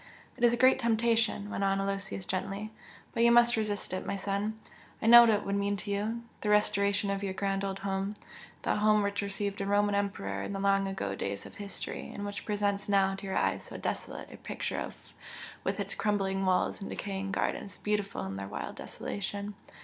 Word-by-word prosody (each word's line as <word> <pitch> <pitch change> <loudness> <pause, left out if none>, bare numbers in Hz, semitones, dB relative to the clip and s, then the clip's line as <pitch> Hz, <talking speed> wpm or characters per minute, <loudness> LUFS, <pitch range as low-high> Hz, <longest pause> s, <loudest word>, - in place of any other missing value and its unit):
"It 245 - -6
is 240 - +7
a 240 - +1
great 260 +1 +6
temptation," 225 -3 +1
went 195 - -2
on 195 0 +2
Aloysius, 195 -1 -2
gently 195 +4 -3 0.4
"But 230 - 0
you 235 0 +6
must 240 0 +6
resist 210 -4 -2
it, 185 - -2
my - - -2
son! 200 +2 -2 0.4
I - - -4
know 240 +1 +11
what 235 - +6
it 210 -2 +2
would 200 - -1
mean 200 0 0
to 200 - -5
you 220 +4 -1 0.2
the 210 - -1
restoration 200 -1 +3
of 200 0 -2
your 195 -2 -3
grand 195 0 0
old 195 -1 -2
home 195 +1 -1 0.5
that - - +1
home 215 0 +4
which 200 0 -1
received 200 0 -2
a - - -1
Roman 205 0 +3
Emperor 195 - -1
in 200 - -4
the 195 - -3
long 195 0 +3
ago 145 - -2
days 100 0 -3
of - - -11
history 200 -1 -5
and 205 - -5
which 205 0 -5
presents 205 -1 0
now 195 -1 +4
to 195 +1 -6
your 190 - -1
eyes - - +1
so - - -8
desolate - - -4
a - - -9
picture - - -4 0.7
with - - -1
its - - -2
crumbling 195 -2 0
walls 185 +1 +2
and 195 - -5
decaying 195 -1 -3
gardens 200 0 -2
beautiful 205 - -1
in 95 0 -5
their 95 0 -5
wild 100 - -5
desolation! 205 +1 -4
200 Hz, 205 wpm, -30 LUFS, 195-210 Hz, 0.7 s, know